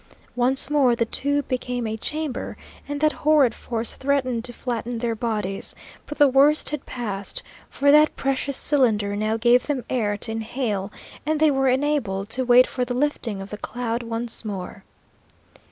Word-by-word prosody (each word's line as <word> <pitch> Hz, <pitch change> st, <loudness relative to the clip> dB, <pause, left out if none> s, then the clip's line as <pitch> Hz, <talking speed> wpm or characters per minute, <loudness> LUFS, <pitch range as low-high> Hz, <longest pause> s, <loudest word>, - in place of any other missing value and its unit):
Once 250 Hz, +2 st, +2 dB
more 275 Hz, -5 st, +3 dB
the 230 Hz, -, +1 dB
tube 285 Hz, +4 st, 0 dB
became 250 Hz, -1 st, -2 dB
a 220 Hz, 0 st, -2 dB
chamber, 300 Hz, +3 st, -4 dB, 0.3 s
and 290 Hz, 0 st, -3 dB
that 310 Hz, 0 st, +4 dB
horrid 295 Hz, -7 st, +3 dB
force 230 Hz, -1 st, -3 dB
threatened 260 Hz, -4 st, 0 dB
to 245 Hz, -, -5 dB
flatten 240 Hz, -1 st, -4 dB
their 230 Hz, 0 st, -1 dB
bodies; 215 Hz, -4 st, -2 dB, 0.3 s
but 295 Hz, -, -7 dB
the 290 Hz, -, +6 dB
worst 280 Hz, +4 st, +4 dB
had 300 Hz, -2 st, -5 dB
passed, 205 Hz, -5 st, -4 dB, 0.3 s
for 285 Hz, +1 st, +3 dB
that 300 Hz, +1 st, +5 dB
precious 275 Hz, 0 st, -1 dB
cylinder 215 Hz, -8 st, +1 dB
now 215 Hz, +2 st, 0 dB
gave 240 Hz, +2 st, +3 dB
them 280 Hz, -4 st, -2 dB
air 210 Hz, -5 st, 0 dB
to 225 Hz, -, -2 dB
inhale, 220 Hz, -3 st, -3 dB, 0.3 s
and 310 Hz, 0 st, 0 dB
they 310 Hz, -1 st, +5 dB
were 270 Hz, -1 st, +1 dB
enabled 250 Hz, -8 st, 0 dB
to 260 Hz, +3 st, 0 dB
wait 250 Hz, 0 st, +6 dB
for 250 Hz, -, -3 dB
the 245 Hz, 0 st, -3 dB
lifting 245 Hz, -7 st, -1 dB
of 195 Hz, -, -12 dB
the 210 Hz, -, -6 dB
cloud 240 Hz, 0 st, -3 dB
once 230 Hz, 0 st, -4 dB
more. 195 Hz, -2 st, -6 dB
245 Hz, 170 wpm, -23 LUFS, 225-280 Hz, 0.3 s, the